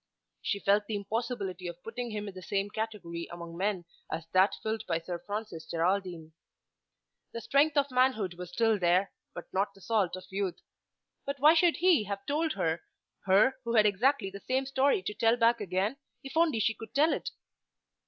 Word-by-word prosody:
She 205 - -1
felt 205 +1 +2
the 220 - -2
impossibility 200 -3 -3
of 175 0 -8
putting 240 +2 -5
him 210 -1 -4
in 200 - -7
the 185 - -9
same 200 +2 -2
category 200 -7 -4
among 170 -1 -8
men 190 -1 -1 0.3
as 160 0 -3
that 190 +2 +4
filled 220 0 -2
by 165 -2 +1
Sir 170 +1 -5
Francis 205 -6 -5
Geraldine. 170 -2 -1 1.0
The 230 - -5
strength 290 +6 +3
of 280 -1 +2
manhood 250 -7 +2
was 180 0 -8
still 225 -2 +2
there, 180 +2 +2 0.2
but - - -6
not 200 +1 0
the 195 - -17
salt 205 -4 +1
of 185 0 -9
youth. 195 -2 -2 0.6
But 280 - -3
why 300 +4 +7
should 335 0 +4
he 345 - +4
have 200 0 -5
told 315 +2 0
her, 165 +1 -1 0.4
her 205 +8 +4
who 235 0 -1
had 215 -1 +6
exactly 210 +1 +2
the 200 - -8
same 260 +5 -1
story 270 -6 +2
to 210 - -3
tell 225 +2 +3
back 235 0 +3
again, 195 +7 -1 0.3
if 270 - -8
only 320 -7 +3
she 225 - +2
could 225 0 -11
tell 305 +3 +4
it? - - -3
205 Hz, 190 wpm, -30 LUFS, 185-245 Hz, 1.0 s, why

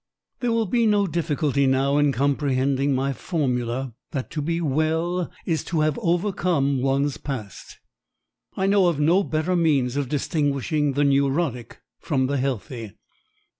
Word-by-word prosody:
There 245 -2 0
will 230 -1 +1
be 230 +3 +2
no 205 -1 +3
difficulty 150 -5 0
now 135 +2 +2
in 145 -1 +3
comprehending 135 0 +1
my 135 +1 0
formula 130 -5 -2 0.2
that 135 -3 -4
to 155 - -3
be 165 +3 -1
well 160 +3 0
is 165 -3 -1
to 165 -3 -1
have 155 -1 +1
overcome 170 -6 +1
one's 135 +1 0
past. 115 -9 -7 0.8
I 190 - +1
know 195 -2 +4
of 165 -4 0
no 170 +7 +3
better 160 +2 -1
means 140 -7 +2
of 140 -3 -1
distinguishing 145 0 0
the 145 +2 +1
neurotic 140 -2 0 0.2
from 130 -1 0
the 140 +2 -1
healthy. 120 -4 -4
145 Hz, 145 wpm, -24 LUFS, 135-170 Hz, 0.8 s, know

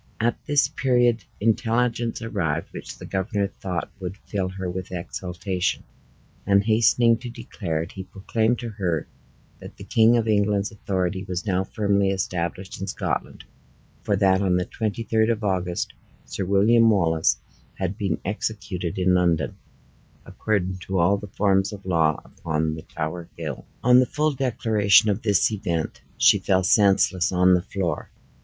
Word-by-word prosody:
At 115 +1 0
this 145 -3 +3
period 125 - +1
intelligence 115 +1 0
arrived, 85 -8 -2
which - - -8
the - - -9
governor 100 +1 -1
thought 90 -3 -4
would 95 +1 -5
fill 95 -3 -2
her 95 0 -5
with 95 +1 -5
exultation; 90 +1 -3 0.6
and 100 0 +3
hastening 115 +1 +4
to 125 +1 -7
declare 85 -8 -4
it, 80 - -10
he 95 - -7
proclaimed 110 +5 -1
to 120 - -4
her, 90 -7 -2 0.5
that - - -11
the - - -9
King 115 +1 +4
of 115 -1 0
England's 105 -1 +1
authority 95 -3 -2
was 90 0 -4
now 95 -2 +1
firmly 100 -1 +1
established 95 -1 -3
in 95 - -3
Scotland, - - -3 0.6
for 100 - 0
that 95 -1 +3
on 95 -2 +2
the 90 - -1
twenty 110 +2 -3
third 110 0 +2
of 115 -2 -1
August 90 -3 -1 0.3
Sir 95 - -4
William 110 +4 +4
Wallace 80 -6 +2 0.4
had 95 0 -3
been 100 -3 -1
executed 95 -3 -3
in 90 0 +3
London, 85 -6 +1 0.7
according 95 -4 -2
to 95 +2 -3
all 90 +4 +3
the 105 +1 -8
forms 95 0 +1
of 100 -2 -10
law, 80 -4 +2
upon 80 -1 -2
the 80 - -7
Tower 80 +2 -5
Hill! 75 -5 -6 0.2
On 125 +1 +7
the 130 - +3
full 155 +3 0
declaration 110 -6 +3
of 100 +3 -2
this 100 -2 +2
event, 85 -6 -3 0.2
she - - +5
fell 95 -1 +1
senseless 95 -2 +3
on 90 0 +4
the 90 - +3
floor. 95 -2 -3
95 Hz, 160 wpm, -24 LUFS, 90-110 Hz, 0.7 s, On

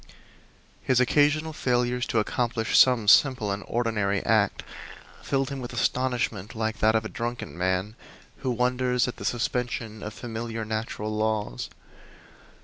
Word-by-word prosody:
His 130 -2 +2
occasional 150 +5 +2
failures 125 -3 0
to - - -1
accomplish 115 +1 0
some 125 -5 +5
simple 125 -3 +5
and 100 +1 -3
ordinary 105 -4 0
act 105 -2 +2 0.6
filled 135 0 -1
him 135 - -4
with 120 -2 -7
astonishment, 120 -6 -1
like 110 0 -2
that 110 +1 +3
of 110 0 +1
a - - -1
drunken 120 -1 -5
man 95 +4 -1 0.4
who 130 - -3
wonders 125 0 +1
at 125 - -5
the - - -7
suspension 120 -2 -2
of 105 0 -6
familiar 115 -1 -5
natural 110 -1 -3
laws. 110 - -1
115 Hz, 140 wpm, -26 LUFS, 110-125 Hz, 0.6 s, some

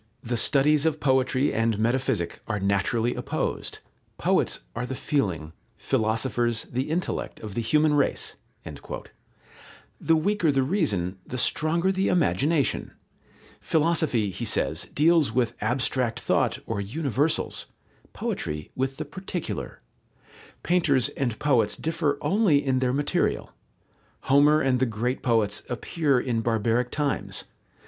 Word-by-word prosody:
"The 120 +1 -2
studies 145 +5 +3
of 155 -1 0
Poetry 130 0 +2
and 115 -1 +1
Metaphysic 120 -4 -1
are 105 -2 -1
naturally 100 +5 +1
opposed. - - -3 0.4
Poets - - +1
are 125 +2 -3
the 130 - -4
feeling, 95 - -1 0.2
philosophers 115 +1 0
the 130 +4 -3
intellect 170 +3 -3
of 105 -2 -7
the 120 - -1
human 150 +6 +3
race." 145 -2 +1 1.6
The 165 - +3
weaker 180 0 +2
the 135 -1 +2
reason, 105 - 0
the 130 - -5
stronger 170 +8 +1
the 190 0 0
imagination. 155 -3 +1 0.7
Philosophy, 155 - +1
he 95 +6 -6
says, 115 - 0
deals 160 -3 +3
with 120 -1 +1
abstract 125 -1 0
thought - - +1
or 105 -3 -2
universals, 140 +6 -1 0.4
poetry 75 0 -4
with 135 +1 -2
the 155 - -4
particular. 180 +3 -6 0.8
Painters 150 -9 +2
and 120 -5 -2
poets 120 -8 +2
differ 160 -3 -1
only 195 -7 +3
in 130 -1 +2
their 130 -1 +1
material. 145 +2 -1 0.7
Homer 145 +3 +4
and 130 -3 +2
the 130 - +2
great 115 +4 -2
poets 110 -4 +1
appear 140 +2 0
in 120 -3 -1
barbaric 115 +2 +1
times. 145 -2 -2
130 Hz, 125 wpm, -26 LUFS, 115-150 Hz, 1.6 s, Homer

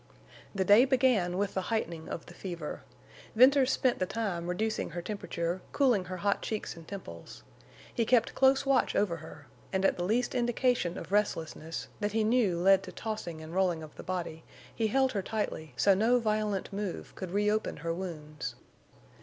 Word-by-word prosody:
The 190 -1 +1
day 205 +5 +7
began 250 -10 +2
with 200 0 -1
the 190 - 0
heightening 170 -8 -2
of 165 - -5
the - - -12
fever. 170 -5 -6 0.5
Venters 265 +3 +6
spent 255 -3 +1
the 185 - 0
time 185 -7 -2
reducing 215 +5 -1
her 175 +1 -5
temperature, 180 -3 -3
cooling 245 -10 +3
her 185 0 -5
hot 200 +2 0
cheeks 215 -2 -4
and 165 -1 -13
temples. 130 - -9 0.5
He 235 - +1
kept 235 0 +3
close 270 +1 +4
watch 275 -1 +2
over 185 -5 +1
her, 160 0 -11 0.3
and 190 0 +1
at - - +3
the 175 - -2
least 235 +6 +1
indication 240 -6 +1
of - - -8
restlessness, 165 -5 -1
that 205 -1 -1
he 220 0 +2
knew 215 -5 +2
led 190 +2 +5
to 185 - -9
tossing 195 -8 -5
and 160 +1 -9
rolling 180 -4 +1
of 155 - -10
the - - -9
body, 175 -3 -4 0.3
he 225 - 0
held 265 +4 +2
her 200 - -1
tightly, 170 - -4
so 195 +10 +5
no 225 +6 +3
violent 215 -4 -1
move 200 -2 -4
could 185 - -6
reopen 210 +3 0
her 165 - 0
wounds. 150 -8 -6
200 Hz, 180 wpm, -30 LUFS, 175-225 Hz, 0.5 s, day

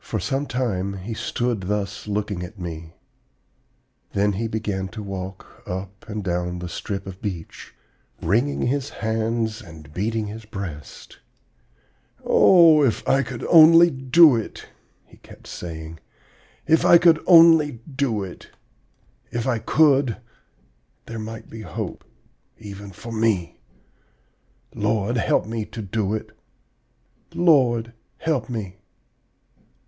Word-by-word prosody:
"For 110 - -3
some 135 +8 -2
time 100 -7 -2
he 100 +4 -6
stood 120 0 -2
thus 100 +2 -3
looking 105 -2 -2
at 90 +4 -8
me; 85 -2 -7 1.2
then 100 +1 +1
he 115 +4 -2
began 105 -4 -3
to 110 +2 -8
walk 95 -1 -8
up 95 +3 -7
and 105 -1 -4
down 90 -1 -2
the 90 0 -6
strip 95 +2 -5
of 95 -1 -9
beach, 90 -6 -7 0.4
wringing 120 - 0
his 140 +2 -1 0.2
hands 110 0 -1
and 80 -6 -13
beating 110 +4 -2
his 110 +2 -8
breast. 95 -8 -9 1.1
'Oh, 165 -4 +6
if 130 -7 0
I 135 - +3
could 125 -2 -6
only 165 +1 +7
do 135 +3 +5
it!' 115 - -5 0.4
he - - -20
kept - - -16
saying; 80 -1 -8 0.7
'if 160 0 +3
I 170 - +8
could 165 -2 +4
only 165 -4 +7 0.2
do 120 -7 0
it! 90 -2 -10 0.8
If 120 0 -3
I 125 -4 0
could, 140 -3 +3 0.9
there 115 -1 -7
might 110 +1 -8
be 110 - -10
hope, - - -6 0.5
even 100 -1 -9
for 105 +5 -10
me. 110 -6 0 1.1
Lord, 105 +2 -1
help - - +1
me 110 0 -3
to 110 0 -8
do 105 +1 -1
it! 110 - -6 1.0
Lord, 125 -9 +3 0.2
help 140 -8 -2
me!' 100 -6 -6
110 Hz, 125 wpm, -23 LUFS, 95-125 Hz, 1.2 s, I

